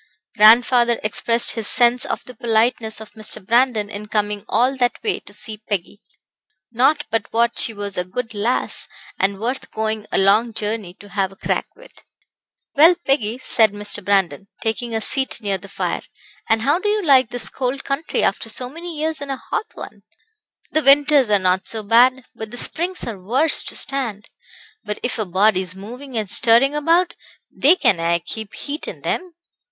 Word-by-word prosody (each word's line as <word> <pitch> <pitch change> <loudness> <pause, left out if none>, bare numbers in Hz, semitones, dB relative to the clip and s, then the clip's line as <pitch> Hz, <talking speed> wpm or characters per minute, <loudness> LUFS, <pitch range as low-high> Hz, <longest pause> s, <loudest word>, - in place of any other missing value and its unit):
Grandfather 235 +2 +5
expressed 230 +2 +2
his 225 -3 -2
sense 245 0 +3
of - - -4
the 250 - -8
politeness 225 -1 0
of 220 -1 -11
Mr. 215 -2 -4
Brandon 235 -2 +2
in 205 +1 -8
coming 210 -1 -2
all 255 +3 +1
that 245 -2 0
way 425 -3 -1
to - - -16
see 215 +1 -5
Peggy. 205 +1 -4 0.7
Not 275 +6 +2
but 225 0 -2
what 235 +1 +1
she - - +3
was 205 -3 -5
a - - 0
good 225 +6 -6
lass, 215 +4 -1 0.3
and 195 0 0
worth 245 +5 -4
going 220 -1 -3
a - - 0
long 210 +4 +3
journey 210 -4 -4
to 205 - -16
have 195 -1 -2
a - - -15
crack - - -2
with. - - -18 0.7
"Well, 325 +4 +6
Peggy," 240 -4 0
said 225 -5 +2
Mr. 205 0 0
Brandon, 195 -3 0
taking 225 +1 -3
a 220 - -1
seat 265 +3 +3
near 200 -3 -2
the 200 +1 -13
fire, - - -3 0.5
"and 225 0 +2
how 290 +7 +2
do 415 - -2
you 420 0 0
like 265 -6 +4
this 245 -1 -4
cold 260 +1 -4
country 275 +3 -2
after 195 +3 -1
so 245 +3 -3
many 335 +1 -8
years 315 0 -3
in 285 - -7
a 270 - -3
hot 435 - -4
one?" - - -10 0.7
"The 310 - +2
winters 280 -2 +4
are 205 - +4
not 185 0 0
so 220 -1 -2
bad, 245 +4 +3
but 220 -1 -8
the 245 - -9
springs 345 +8 0
are 215 -5 -7
worse 260 +11 +5
to - - -5
stand. 245 -7 +2 0.5
But 210 - -5
if 245 -1 -3
a 215 - -1
body's 185 -1 +1
moving 245 +6 -9
and 215 -2 -2
stirring 240 +7 +4
about 335 +4 +1 0.4
they 305 +7 +5
can 195 - +2
aye 170 +1 +1
keep 210 +5 -5
heat 295 +2 -5
in - - -8
them." 360 -2 -3
230 Hz, 185 wpm, -20 LUFS, 205-270 Hz, 0.7 s, Well